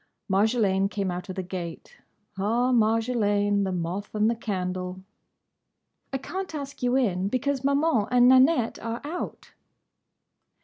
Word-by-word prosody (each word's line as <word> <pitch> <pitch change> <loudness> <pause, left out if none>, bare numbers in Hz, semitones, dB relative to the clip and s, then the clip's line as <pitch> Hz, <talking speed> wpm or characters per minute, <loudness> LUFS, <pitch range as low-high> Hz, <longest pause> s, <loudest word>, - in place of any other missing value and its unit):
Marjolaine 195 -1 +2
came 200 -3 -2
out 180 +2 -6
of 185 - -5
the 190 - -3
gate. 175 -2 -7 0.4
Ah, 230 +6 +1
Marjolaine! 215 -3 +2
The 190 - -2
moth 180 +4 -4
and 215 +2 +3
the - - -1
candle! 185 -3 -4 1.1
"I 270 - -1
can't 370 +5 -5
ask 280 -1 -7
you 245 0 +1
in, 195 -8 +1
because 260 +4 -1
Maman 280 -6 +2
and 245 0 +5
Nanette 260 -1 +4
are 230 +1 -4
out." 320 +5 -6
220 Hz, 135 wpm, -26 LUFS, 190-255 Hz, 1.1 s, and